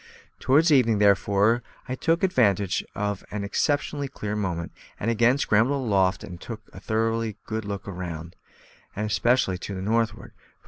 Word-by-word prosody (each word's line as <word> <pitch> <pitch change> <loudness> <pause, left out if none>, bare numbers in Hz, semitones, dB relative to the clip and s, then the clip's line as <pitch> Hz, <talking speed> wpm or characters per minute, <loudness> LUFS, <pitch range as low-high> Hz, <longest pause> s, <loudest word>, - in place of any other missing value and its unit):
Towards 155 +5 +4
evening, 120 -6 +4
therefore, 100 +3 +3 0.3
I 130 - -3
took 165 +6 0
advantage 100 - +2
of 105 -1 -2
an 105 -1 -4
exceptionally 145 +6 0
clear 105 -6 -5
moment, 90 -5 -3 0.3
and 115 - 0
again 120 +3 +3
scrambled 130 +2 +2
aloft 95 -4 +2
and 90 -2 -9
took 115 -3 -7
a - - -9
thorough 115 +2 0
good 110 -1 -4
look 100 -1 -5
all 100 - -5
round, 85 -1 -6 0.6
and 105 +2 -2
especially 105 -2 +2
to 100 - -6
the 95 - -5
northward. 110 +1 -1
105 Hz, 155 wpm, -25 LUFS, 100-120 Hz, 0.6 s, Towards